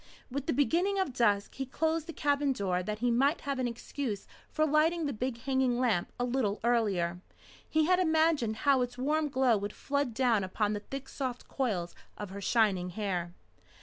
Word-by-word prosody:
With 280 Hz, +1 st, -4 dB
the -, -, +2 dB
beginning 340 Hz, +9 st, +2 dB
of 380 Hz, -9 st, 0 dB
dusk 205 Hz, -5 st, +2 dB
he 270 Hz, -, -4 dB
closed 320 Hz, +3 st, -1 dB
the -, -, -4 dB
cabin 285 Hz, -2 st, +1 dB
door 185 Hz, -5 st, -1 dB
that 210 Hz, +3 st, -3 dB
he 245 Hz, -, +3 dB
might 275 Hz, +7 st, +2 dB
have 280 Hz, -2 st, -3 dB
an 255 Hz, -, +1 dB
excuse 235 Hz, -2 st, -4 dB, 0.2 s
for 310 Hz, -, +1 dB
lighting 315 Hz, +2 st, +2 dB
the 285 Hz, -, -1 dB
big 235 Hz, +1 st, -3 dB
hanging 260 Hz, -2 st, +1 dB
lamp 220 Hz, -9 st, +1 dB
a -, -, +1 dB
little 240 Hz, -5 st, 0 dB
earlier. 200 Hz, -8 st, +1 dB, 0.5 s
He 315 Hz, 0 st, +3 dB
had 365 Hz, +2 st, +3 dB
imagined 315 Hz, -9 st, +2 dB
how 275 Hz, -2 st, +5 dB
its 245 Hz, 0 st, -3 dB
warm 300 Hz, +4 st, +1 dB
glow 260 Hz, -4 st, +3 dB
would 205 Hz, +1 st, -4 dB
flood 280 Hz, -4 st, -2 dB
down 235 Hz, -5 st, +2 dB
upon 205 Hz, +3 st, -1 dB
the 205 Hz, -, -2 dB
thick 270 Hz, +5 st, -7 dB
soft 255 Hz, -3 st, -5 dB
coils 195 Hz, -10 st, -2 dB, 0.2 s
of 205 Hz, -2 st, -6 dB
her 200 Hz, +1 st, -7 dB
shining 195 Hz, -4 st, +2 dB
hair. 180 Hz, -3 st, -3 dB
250 Hz, 190 wpm, -30 LUFS, 210-285 Hz, 0.5 s, how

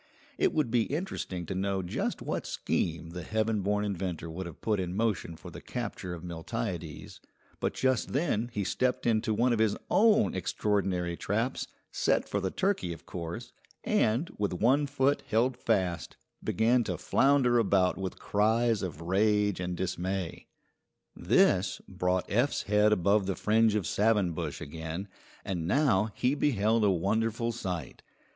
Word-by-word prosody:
It -, -, +3 dB
would 150 Hz, -7 st, 0 dB
be 120 Hz, -2 st, +3 dB
interesting 145 Hz, -, -3 dB
to 95 Hz, -, -4 dB
know 95 Hz, 0 st, -1 dB
just 90 Hz, -, -3 dB
what -, -, -3 dB
scheme 85 Hz, 0 st, -2 dB
the 90 Hz, +1 st, -6 dB
heaven 110 Hz, +3 st, 0 dB
born 105 Hz, +2 st, 0 dB
inventor 90 Hz, -4 st, -3 dB
would 90 Hz, +2 st, -5 dB
have 85 Hz, -, -10 dB
put 105 Hz, -3 st, 0 dB
in 90 Hz, -1 st, -3 dB
motion 105 Hz, -6 st, -1 dB
for -, -, -11 dB
the -, -, -9 dB
capture 90 Hz, -1 st, -5 dB
of 85 Hz, -, -10 dB
Miltiades, 85 Hz, -, -5 dB, 0.4 s
but -, -, -1 dB
just 130 Hz, -4 st, +1 dB
then 125 Hz, -6 st, 0 dB
he 105 Hz, -3 st, -2 dB
stepped 125 Hz, +6 st, 0 dB
into 110 Hz, -1 st, +2 dB
one 120 Hz, +3 st, +2 dB
of 115 Hz, -, 0 dB
his 110 Hz, -2 st, +2 dB
own 220 Hz, 0 st, +4 dB
extraordinary 95 Hz, -4 st, 0 dB
traps, 115 Hz, +9 st, -1 dB, 0.2 s
set -, -, +1 dB
for -, -, -1 dB
the 95 Hz, -, 0 dB
turkey 190 Hz, -, 0 dB
of 80 Hz, -, -13 dB
course, 85 Hz, -1 st, -6 dB, 0.3 s
and, 120 Hz, +10 st, +1 dB
with 100 Hz, -2 st, 0 dB
one 130 Hz, +10 st, +3 dB
foot 140 Hz, 0 st, +1 dB
held 120 Hz, +3 st, +2 dB
fast, 95 Hz, -9 st, -1 dB, 0.3 s
began 120 Hz, +3 st, +2 dB
to -, -, -2 dB
flounder 135 Hz, -3 st, +3 dB
about 95 Hz, -4 st, +3 dB
with 95 Hz, 0 st, -5 dB
cries 110 Hz, +2 st, +2 dB
of 85 Hz, -4 st, -5 dB
rage 105 Hz, +3 st, +2 dB
and 90 Hz, -1 st, -3 dB
dismay. 95 Hz, -1 st, -3 dB, 0.7 s
This 90 Hz, 0 st, +3 dB
brought 90 Hz, -1 st, -1 dB
Eph's 120 Hz, +7 st, +1 dB
head 105 Hz, +1 st, +3 dB
above 100 Hz, 0 st, +3 dB
the 95 Hz, -, 0 dB
fringe 110 Hz, 0 st, +3 dB
of 105 Hz, -4 st, 0 dB
savin 105 Hz, -3 st, +2 dB
bush 80 Hz, -, -4 dB
again, 80 Hz, +6 st, -5 dB, 0.4 s
and 85 Hz, -4 st, -2 dB
now 110 Hz, -, +3 dB
he 125 Hz, +2 st, +1 dB
beheld 115 Hz, -6 st, +2 dB
a 105 Hz, -, +5 dB
wonderful 110 Hz, +6 st, 0 dB
sight. 90 Hz, -, -5 dB
105 Hz, 160 wpm, -29 LUFS, 90-115 Hz, 0.7 s, a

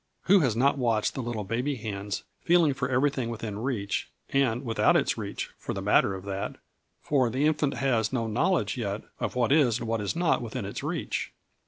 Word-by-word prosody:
Who 195 Hz, +2 st, +6 dB
has 130 Hz, -9 st, +2 dB
not 140 Hz, +4 st, +3 dB
watched 115 Hz, -4 st, +1 dB
the 130 Hz, -, -3 dB
little 115 Hz, -3 st, -3 dB
baby 125 Hz, +8 st, -1 dB
hands 100 Hz, -3 st, -4 dB, 0.2 s
feeling 170 Hz, -4 st, +4 dB
for 130 Hz, -1 st, -2 dB
everything 130 Hz, -1 st, +1 dB
within 110 Hz, -3 st, -5 dB
reach, 110 Hz, -5 st, -2 dB, 0.2 s
and 130 Hz, -2 st, +2 dB
without 115 Hz, -1 st, +3 dB
its -, -, +1 dB
reach, -, -, -5 dB
for -, -, -4 dB
the -, -, -3 dB
matter 95 Hz, -, +3 dB
of 95 Hz, 0 st, -8 dB
that; 100 Hz, +1 st, -3 dB, 0.5 s
for 130 Hz, -5 st, +2 dB
the 130 Hz, +5 st, 0 dB
infant 150 Hz, -2 st, +1 dB
has 115 Hz, -6 st, +1 dB
no 120 Hz, -3 st, 0 dB
knowledge 145 Hz, -, +1 dB
yet 105 Hz, -3 st, -3 dB, 0.2 s
of 115 Hz, -3 st, -2 dB
what 125 Hz, 0 st, +2 dB
is 135 Hz, -7 st, +4 dB
and 120 Hz, -, -5 dB
what 115 Hz, -1 st, 0 dB
is 105 Hz, -, -2 dB
not 170 Hz, -1 st, +2 dB
within 120 Hz, -1 st, -4 dB
its 100 Hz, -, -5 dB
reach. -, -, -3 dB
120 Hz, 200 wpm, -27 LUFS, 110-140 Hz, 0.5 s, Who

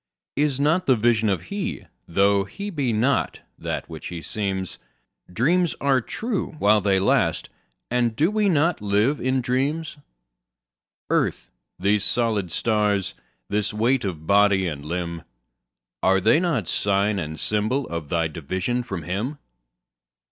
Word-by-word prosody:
Is 140 Hz, -1 st, +1 dB
not 160 Hz, +6 st, +2 dB
the 130 Hz, -, +6 dB
Vision 110 Hz, -1 st, +2 dB
He? 200 Hz, -1 st, -4 dB, 0.2 s
tho' 100 Hz, +3 st, +3 dB
He 200 Hz, -, -6 dB
be 140 Hz, -8 st, 0 dB
not 120 Hz, +6 st, +1 dB, 0.2 s
that -, -, -4 dB
which 80 Hz, -2 st, -8 dB
He 85 Hz, -3 st, -6 dB
seems? 95 Hz, +1 st, -3 dB, 0.5 s
Dreams 170 Hz, -, +2 dB
are 135 Hz, -2 st, +2 dB
true 215 Hz, -, -3 dB
while 105 Hz, -4 st, +4 dB
they 95 Hz, -1 st, +2 dB
last, 95 Hz, -, +1 dB, 0.4 s
and 120 Hz, -2 st, +1 dB
do 160 Hz, -, +2 dB
we 210 Hz, -1 st, +2 dB
not 165 Hz, -, +2 dB
live 105 Hz, +8 st, +2 dB
in 130 Hz, 0 st, +1 dB
dreams? 145 Hz, +6 st, -1 dB, 1.1 s
Earth, -, -, 0 dB, 0.3 s
these 100 Hz, +2 st, +1 dB
solid 110 Hz, -8 st, +1 dB
stars, 105 Hz, -2 st, +1 dB, 0.3 s
this 105 Hz, 0 st, -1 dB
weight 120 Hz, +4 st, +2 dB
of 85 Hz, -6 st, -4 dB
body 100 Hz, 0 st, +4 dB
and 75 Hz, -4 st, -5 dB
limb, 85 Hz, +1 st, -4 dB, 0.8 s
Are 95 Hz, +1 st, +4 dB
they 110 Hz, -, +4 dB
not 155 Hz, -, 0 dB
sign 100 Hz, 0 st, +1 dB
and 80 Hz, -2 st, -5 dB
symbol 110 Hz, +6 st, 0 dB
of 85 Hz, -4 st, -5 dB
thy 85 Hz, -2 st, +1 dB
division 95 Hz, -, -2 dB
from 95 Hz, -9 st, -5 dB
Him? 105 Hz, -, -3 dB
105 Hz, 140 wpm, -24 LUFS, 95-135 Hz, 1.1 s, the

